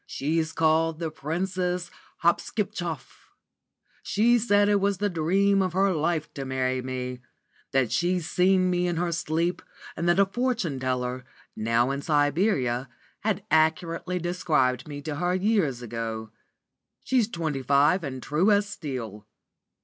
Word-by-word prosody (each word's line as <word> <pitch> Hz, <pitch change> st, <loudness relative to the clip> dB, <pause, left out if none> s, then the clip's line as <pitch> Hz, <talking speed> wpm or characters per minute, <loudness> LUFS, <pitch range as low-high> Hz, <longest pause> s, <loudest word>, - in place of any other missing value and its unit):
She's 160 Hz, +3 st, -1 dB
called 160 Hz, 0 st, +2 dB
the 165 Hz, -1 st, -3 dB
Princess 180 Hz, +3 st, -2 dB, 0.3 s
Hopskipchoff. 170 Hz, -, -2 dB, 0.7 s
She 235 Hz, +4 st, +3 dB
said 205 Hz, -2 st, +3 dB
it 205 Hz, -1 st, +3 dB
was 200 Hz, -1 st, +1 dB
the 205 Hz, +1 st, -1 dB
dream 195 Hz, +5 st, +2 dB
of 185 Hz, -2 st, -1 dB
her 195 Hz, +1 st, +3 dB
life 160 Hz, -1 st, -1 dB
to 140 Hz, -, -5 dB
marry 130 Hz, -1 st, -1 dB
me; 125 Hz, 0 st, -4 dB, 0.5 s
that 130 Hz, -4 st, +1 dB
she's 175 Hz, -1 st, 0 dB
seen 185 Hz, +1 st, +3 dB
me 180 Hz, 0 st, +1 dB
in 175 Hz, -, -1 dB
her 170 Hz, +1 st, -1 dB
sleep 165 Hz, +2 st, -1 dB, 0.3 s
and 170 Hz, -, 0 dB
that 175 Hz, -, +3 dB
a 200 Hz, -, +6 dB
fortune 215 Hz, -, -1 dB
teller, 125 Hz, -1 st, -2 dB, 0.3 s
now 115 Hz, +4 st, +1 dB
in 140 Hz, +1 st, -3 dB
Siberia, 145 Hz, -, +1 dB, 0.3 s
had -, -, -1 dB
accurately 165 Hz, +3 st, +1 dB
described 160 Hz, -7 st, 0 dB
me 145 Hz, -1 st, -7 dB
to 150 Hz, -1 st, -4 dB
her 180 Hz, +2 st, 0 dB
years 185 Hz, -, +1 dB
ago. 115 Hz, -1 st, -5 dB, 0.7 s
She's 250 Hz, -5 st, +2 dB
twenty 160 Hz, -9 st, -3 dB
five 145 Hz, +7 st, +3 dB
and 130 Hz, -3 st, -5 dB
true 160 Hz, +8 st, +2 dB
as 205 Hz, 0 st, +3 dB
steel. 115 Hz, -, -6 dB
165 Hz, 140 wpm, -26 LUFS, 135-185 Hz, 0.7 s, a